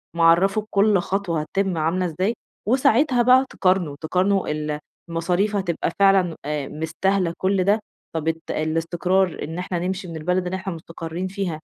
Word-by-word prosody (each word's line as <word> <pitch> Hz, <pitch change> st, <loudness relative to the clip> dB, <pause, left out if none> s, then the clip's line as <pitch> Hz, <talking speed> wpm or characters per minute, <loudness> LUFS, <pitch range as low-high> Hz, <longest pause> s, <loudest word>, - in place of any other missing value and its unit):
معَرَّفه 170 Hz, +5 st, +4 dB
بكل 205 Hz, -1 st, +3 dB
خطوة 175 Hz, -3 st, -1 dB
هتتِم 190 Hz, +3 st, -1 dB
عاملة 165 Hz, +4 st, 0 dB
إزاي 185 Hz, +6 st, 0 dB, 0.3 s
وساعتها 255 Hz, +2 st, +3 dB
بقى 255 Hz, +2 st, +6 dB
تقارنوا، 185 Hz, -6 st, +1 dB
تقارنوا 185 Hz, +4 st, +1 dB
ال 150 Hz, 0 st, -3 dB, 0.3 s
المصاريف 180 Hz, +5 st, 0 dB
هتبقى 175 Hz, -4 st, -1 dB
فعلًا 195 Hz, -4 st, +4 dB
آآ 150 Hz, -2 st, -2 dB
مستاهلة 170 Hz, +3 st, -1 dB
كل 190 Hz, 0 st, +1 dB
ده، 205 Hz, +4 st, +3 dB, 0.4 s
طَب 160 Hz, -1 st, -2 dB
ات 165 Hz, 0 st, 0 dB
الاستقرار 170 Hz, +3 st, 0 dB
إن 160 Hz, +3 st, -5 dB
إحنا 180 Hz, -1 st, -2 dB
نمشي 185 Hz, +2 st, -3 dB
من 165 Hz, -, -7 dB
البلد 180 Hz, +3 st, 0 dB
اللي 180 Hz, +1 st, -2 dB
إحنا 190 Hz, 0 st, -4 dB
مُستقرّين 165 Hz, +2 st, -6 dB
فيها 185 Hz, -5 st, -3 dB
180 Hz, 155 wpm, -23 LUFS, 165-195 Hz, 0.4 s, بقى